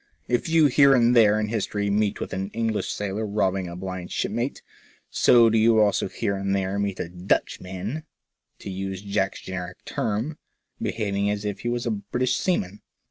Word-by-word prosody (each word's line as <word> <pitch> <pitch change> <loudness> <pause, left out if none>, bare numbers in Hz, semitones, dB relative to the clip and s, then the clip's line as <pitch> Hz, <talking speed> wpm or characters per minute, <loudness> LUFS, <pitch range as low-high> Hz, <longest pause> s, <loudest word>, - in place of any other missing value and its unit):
If 120 +5 0
you 160 -1 +5
here 140 0 +6
and 120 0 +4
there 110 -2 +5
in 105 -1 -1
history 105 -2 -1
meet 105 0 +1
with - - -5
an 95 +1 -3
English 115 -2 -1
sailor 105 +1 -3
robbing 95 -2 0
a 85 - -7
blind 90 -1 -6
shipmate, 120 +5 -2 0.5
so 120 -2 +6
do 110 0 +3
you 110 0 +5
also 105 -2 +3
here 100 - -2
and 100 0 -1
there 95 +1 -1
meet 100 -2 -1
with - - -3
a - - -17
"Dutchman," 95 - -2 0.5
to - - -8
use 95 0 -5
Jack's 100 -1 -1
generic 90 -1 -7
term, 115 +8 -2 0.4
behaving 100 -2 -1
as 105 0 -2
if 105 -1 -3
he 120 - -3
were 120 - 0
a 120 - 0
British 120 +5 -1
seaman. 105 - -1
105 Hz, 185 wpm, -25 LUFS, 95-115 Hz, 0.5 s, here